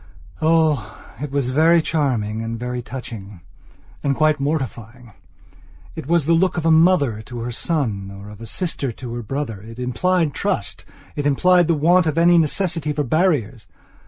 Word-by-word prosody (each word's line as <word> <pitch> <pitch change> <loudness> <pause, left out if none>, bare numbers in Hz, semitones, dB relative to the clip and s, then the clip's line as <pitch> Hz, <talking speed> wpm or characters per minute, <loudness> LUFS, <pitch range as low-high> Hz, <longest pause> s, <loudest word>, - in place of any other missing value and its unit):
oh, 155 -6 +1 0.2
it 150 - -3
was 135 -2 -1
very 165 +5 +5
charming 125 -10 -1
and 115 0 -4
very 125 0 -3
touchingand 105 -7 -8 0.7
quite 155 0 +2
mortifying. 125 -5 -4 0.8
It - - -7
was 170 -2 +2
the 165 - +3
look 180 +2 +2
of 165 - -2
a 165 - +4
mother 160 - +3
to 120 +2 -8
her 120 +1 -4
son, 115 - -2 0.2
of 105 +1 -13
a 115 - -7
sister 160 -6 -2
to 120 0 -8
her 120 - -4
brother. 115 -3 -4
It 115 +2 -11
implied 150 +6 0
trust; 200 - -3 0.3
it 145 0 -1
implied 175 +4 +4
the 165 - +2
want 170 +3 +3
of 155 0 -1
any 170 +1 +5
necessity 160 -1 0
for 150 0 -1
barriers. 135 - 0
145 Hz, 160 wpm, -21 LUFS, 115-165 Hz, 0.8 s, very